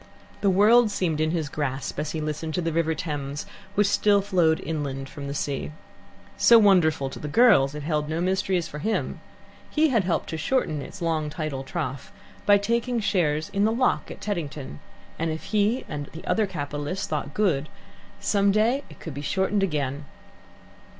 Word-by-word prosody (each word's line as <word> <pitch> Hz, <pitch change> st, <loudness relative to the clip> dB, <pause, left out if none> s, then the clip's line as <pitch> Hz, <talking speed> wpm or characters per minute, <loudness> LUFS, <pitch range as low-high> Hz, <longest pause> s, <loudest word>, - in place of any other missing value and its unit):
The 200 Hz, -, +3 dB
world 215 Hz, +5 st, +5 dB
seemed 170 Hz, -6 st, -1 dB
in 155 Hz, -, +2 dB
his 160 Hz, -2 st, -1 dB
grasp 140 Hz, -2 st, -3 dB
as 150 Hz, 0 st, -2 dB
he 160 Hz, -, -3 dB
listened 155 Hz, +1 st, -3 dB
to 180 Hz, -, 0 dB
the 165 Hz, -1 st, -2 dB
River 160 Hz, -1 st, +1 dB
Thames, 145 Hz, -3 st, -4 dB, 0.3 s
which 205 Hz, -, +4 dB
still 200 Hz, 0 st, +3 dB
flowed 180 Hz, -5 st, +2 dB
inland 140 Hz, -4 st, -3 dB
from 140 Hz, -1 st, -7 dB
the 140 Hz, -, -4 dB
sea. 140 Hz, 0 st, -2 dB, 0.7 s
So 235 Hz, -, +7 dB
wonderful 175 Hz, -10 st, +4 dB
to -, -, -8 dB
the 150 Hz, -, -5 dB
girls, 150 Hz, -, +5 dB
it 150 Hz, -, -5 dB
held 150 Hz, -1 st, -1 dB
no 160 Hz, +1 st, -1 dB
mysteries 185 Hz, -1 st, 0 dB
for 150 Hz, -, -7 dB
him. 220 Hz, +6 st, -2 dB, 0.5 s
He 315 Hz, 0 st, +3 dB
had 230 Hz, -6 st, +2 dB
helped 175 Hz, -2 st, -1 dB
to 160 Hz, -, -3 dB
shorten 160 Hz, -, 0 dB
its 175 Hz, -, -8 dB
long 160 Hz, -2 st, 0 dB
tidal 150 Hz, -3 st, -4 dB
trough 135 Hz, -2 st, -5 dB, 0.4 s
by 205 Hz, 0 st, +7 dB
taking 235 Hz, +4 st, 0 dB
shares 155 Hz, -7 st, 0 dB
in 200 Hz, 0 st, 0 dB
the 220 Hz, -, +3 dB
lock 250 Hz, +2 st, +1 dB
at -, -, -9 dB
Teddington, 150 Hz, -, -4 dB, 0.4 s
and 165 Hz, 0 st, 0 dB
if 160 Hz, 0 st, -4 dB
he 215 Hz, +4 st, +1 dB
and 145 Hz, -2 st, -5 dB, 0.2 s
other 220 Hz, -2 st, +1 dB
capitalists 145 Hz, +1 st, -4 dB
thought 150 Hz, -2 st, -4 dB
good, 155 Hz, -9 st, +1 dB, 0.5 s
some 200 Hz, -1 st, +2 dB
day 230 Hz, +7 st, +2 dB
it -, -, -14 dB
could 160 Hz, -, -7 dB
be 140 Hz, -, -6 dB
shortened 190 Hz, +6 st, 0 dB
again. 145 Hz, -5 st, -1 dB
165 Hz, 180 wpm, -25 LUFS, 150-200 Hz, 0.7 s, So